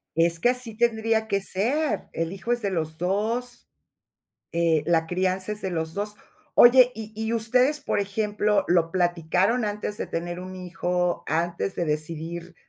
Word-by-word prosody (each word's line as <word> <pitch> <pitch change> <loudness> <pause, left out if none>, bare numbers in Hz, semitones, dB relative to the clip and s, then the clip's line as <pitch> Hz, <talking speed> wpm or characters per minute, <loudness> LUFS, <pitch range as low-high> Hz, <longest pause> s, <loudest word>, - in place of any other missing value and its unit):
Es 165 +1 +2
que 240 - +3
así 250 -3 -1
tendría 225 -1 +1
que 200 -2 0
ser, 250 +12 -1
el 165 +2 -2
hijo 195 +5 -4
es 240 0 +1
de 200 -2 -1
los 160 -3 -3
2, 225 +7 -2 0.9
eh, 165 -2 +2
la 165 -1 +2
crianza 185 +3 0
es 210 - -4
de 190 - -2
los 160 -2 -3
2. 205 +1 -3 0.4
Oye, 250 +1 +7
¿y 220 -1 -8
y 220 +1 -2
ustedes, 250 +6 +2
por 290 - -1
ejemplo, 210 +1 0
lo 170 -2 +3
platicaron 180 +6 +1
antes 210 0 -3
de - - -4
tener 175 +1 -4
un 185 +1 -8
hijo, 180 -1 -2
antes 170 +4 -1
de 175 - -2
decidir, 165 +3 -4
190 Hz, 165 wpm, -25 LUFS, 170-220 Hz, 0.9 s, Oye